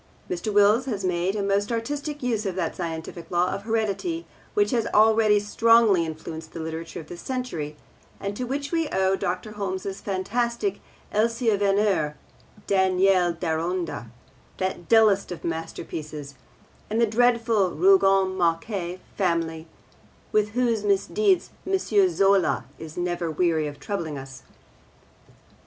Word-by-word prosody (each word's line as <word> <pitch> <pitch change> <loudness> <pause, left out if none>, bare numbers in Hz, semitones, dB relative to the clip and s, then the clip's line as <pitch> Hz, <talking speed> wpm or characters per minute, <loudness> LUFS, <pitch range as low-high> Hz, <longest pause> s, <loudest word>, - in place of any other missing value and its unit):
Mr. 180 +4 -3
Wills 205 +4 +4
has 205 -7 -3
made 180 +2 0
a 205 - -1
most 200 +2 +1
artistic 290 +5 -3
use 230 -4 0
of 185 - -3
that 170 -4 -2
scientific 165 0 -6
law 175 +1 +1
of 195 - -3
heredity 225 - -1 0.3
which 410 -5 +3
has 235 -3 +1
already 215 -1 +5
strongly 210 -3 +4
influenced 160 0 -7
the - - -6
literature 160 +1 -5
of 160 - -9
this 175 +2 -9
century, 205 - -4 0.4
and 200 +1 -4
to 250 - -3
which 280 +3 -3
we 330 -3 0
owe 190 0 +2
Dr. 190 +3 -3
Holmes's 195 -1 -4
fantastic 235 - -1 0.3
Elsie 230 +1 +2
Venner, 195 -6 +1 0.5
Daniel 190 -1 +3
Deronda 165 -3 -2 0.5
that 185 -2 -3
dullest 215 -4 +4
of 175 - -7
masterpieces 155 -3 -5 0.6
and 220 +2 0
the 235 - +5
dreadful 230 -3 +2
Rougon 195 - +4
Macquart 175 +1 -1
family 165 -3 -1 0.6
with 210 0 +1
whose 235 -3 +1
misdeeds 360 - +2 0.2
M. 385 0 +2
Zola 200 - +2
is 160 -1 -9
never 175 -1 -1
weary 160 -1 +1
of 145 -1 -8
troubling 165 -8 -4
us. 135 -1 -9
195 Hz, 135 wpm, -25 LUFS, 170-230 Hz, 0.6 s, already